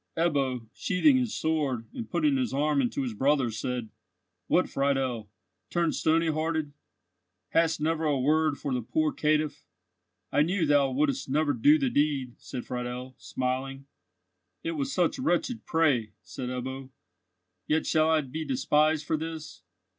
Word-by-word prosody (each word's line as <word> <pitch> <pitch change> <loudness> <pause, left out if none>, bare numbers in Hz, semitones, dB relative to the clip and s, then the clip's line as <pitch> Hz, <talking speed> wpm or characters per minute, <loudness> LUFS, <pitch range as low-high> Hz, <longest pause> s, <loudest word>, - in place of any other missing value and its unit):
Ebbo, 135 -8 0
sheathing 260 +9 +3
his 250 -4 0
sword, 145 -7 -1
and 235 - -6
putting 300 -3 +2
his 255 - -1
arm 145 0 +2
into 130 +2 -1
his 125 -3 -3
brother's, 130 -1 +1
said: 125 -3 -3 0.6
"What, 180 - +3
Friedel, 135 -6 -1 0.4
turned 170 -2 +1
stony 165 +1 +2
hearted? 155 -1 -1 0.8
Hadst 165 -1 +2
never 160 +1 0
a 145 -3 +2
word 155 +2 +2
for 140 - -3
the 125 - 0
poor 155 +6 0
caitiff?" 150 -1 0 0.7
"I - - +3
knew 175 +2 +1
thou 145 -2 +4
wouldst 135 0 0
never 145 +1 +2
do 295 +2 +5
the 270 -4 0
deed," 140 - +1
said 125 -3 -7
Friedel, 125 +1 -5
smiling. 130 +1 -3 0.8
"It 165 - -1
was 145 -4 -2
such 180 +6 +1
wretched 235 +1 -1
prey," 135 -10 +2
said 110 +8 -6
Ebbo. 130 +1 -5 0.8
"Yet 155 +1 +1
shall 155 0 +3
I 160 -1 +4
be 150 +3 -5
despised 155 - +2
for 160 - 0
this! 160 - -7
150 Hz, 150 wpm, -28 LUFS, 130-160 Hz, 0.8 s, do